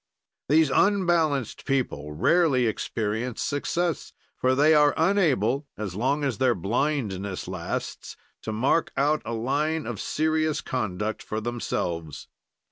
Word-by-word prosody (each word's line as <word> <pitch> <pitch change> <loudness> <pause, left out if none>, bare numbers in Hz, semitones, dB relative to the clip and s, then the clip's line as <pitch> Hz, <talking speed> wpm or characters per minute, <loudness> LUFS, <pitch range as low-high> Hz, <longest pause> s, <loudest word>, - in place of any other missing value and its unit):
"These 155 -1 +4
unbalanced 170 - +2
people 120 - -1
rarely 135 - +3
experience 110 +2 -2
success, 170 +3 -2 0.2
for 130 0 +1
they 150 +3 +5
are 150 -1 +5
unable, 150 - +2
as 105 -4 -4
long 135 +9 0
as 130 -7 -1
their 130 -2 +3
blindness 100 - -2
lasts, 90 -2 -5 0.2
to 110 - -4
mark 130 +9 +1
out 150 +2 +2
a 120 - -3
line 150 +7 -1
of 120 -5 -4
serious 155 0 0
conduct 110 -3 -3
for 110 - -4
themselves. 85 - -4
130 Hz, 125 wpm, -26 LUFS, 110-155 Hz, 0.2 s, they